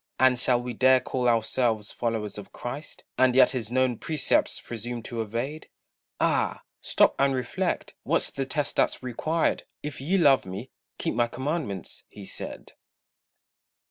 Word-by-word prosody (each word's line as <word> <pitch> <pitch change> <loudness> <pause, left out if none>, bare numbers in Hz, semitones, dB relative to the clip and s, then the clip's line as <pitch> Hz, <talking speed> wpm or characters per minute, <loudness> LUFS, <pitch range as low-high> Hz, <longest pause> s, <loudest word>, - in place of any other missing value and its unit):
And 130 -1 +5
shall 125 -1 +3
we 125 0 -4
dare 130 +3 +5
call 125 -1 0
ourselves 115 -1 +1
followers 110 -3 -2
of 100 -1 -11
Christ, 135 +5 -7 0.2
And 130 -1 +5
yet 130 -1 +7
his 120 -4 -3
known 130 -2 +2
precepts 155 -4 +1
presume 120 0 -6
to 115 -1 -4
evade? 120 +8 -4 0.5
Ah! - - +1 0.2
stop - - +4
and 135 -1 +3
reflect, 125 - -2
what's - - 0
the 135 -1 -3
test 145 +2 -2
that's - - +1
required? 155 +7 0 0.2
"If 150 -3 -5
ye 175 +8 +1
love 145 -7 +5
me, 100 +8 -7 0.3
keep - - -1
my 120 -1 +2
commandments," 130 - -4
he 100 - -11
said. - - -7
125 Hz, 150 wpm, -27 LUFS, 115-135 Hz, 0.5 s, yet